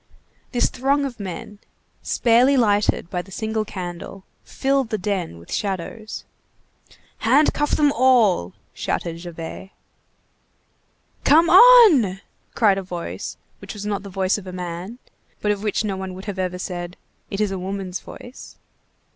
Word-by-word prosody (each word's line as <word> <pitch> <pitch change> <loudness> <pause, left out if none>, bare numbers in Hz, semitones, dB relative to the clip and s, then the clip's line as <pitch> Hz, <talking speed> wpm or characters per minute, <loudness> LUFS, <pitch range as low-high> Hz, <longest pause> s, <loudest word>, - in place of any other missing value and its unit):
This 245 - +2
throng 280 +3 0
of 245 -4 -6
men, 200 +2 -7 0.4
sparely 245 +4 +3
lighted 205 -6 +1
by 180 - -1
the 185 - -17
single 220 +3 -2
candle, 185 -1 -7 0.2
filled 270 -3 0
the 215 - -1
den 185 - -3
with 85 - -10
shadows. 205 +3 -4 0.9
"Handcuff 290 +5 +3
them 295 -1 +3
all!" 230 - +3 0.2
shouted 165 -1 -3
Javert. 170 +2 -8 1.5
"Come 325 +4 +5
on!" 370 - +8 0.4
cried 205 -4 +3
a - - -4
voice 170 - -6 0.2
which - - -9
was 205 0 -7
not 205 -1 -2
the 200 - -9
voice 190 +1 0
of 190 - -12
a - - -6
man, 180 +4 -6 0.4
but 210 - +1
of 205 -1 -2
which 215 +1 -1
no 200 -2 -2
one 190 -1 -6
would 190 +3 -10
ever 190 -2 -2
have 180 0 -8
said: 175 -1 -5 0.3
"It 195 - -4
is 210 -2 +1
a 190 - -3
woman's 190 -1 -4
voice." 245 +2 -12
200 Hz, 145 wpm, -22 LUFS, 185-240 Hz, 1.5 s, on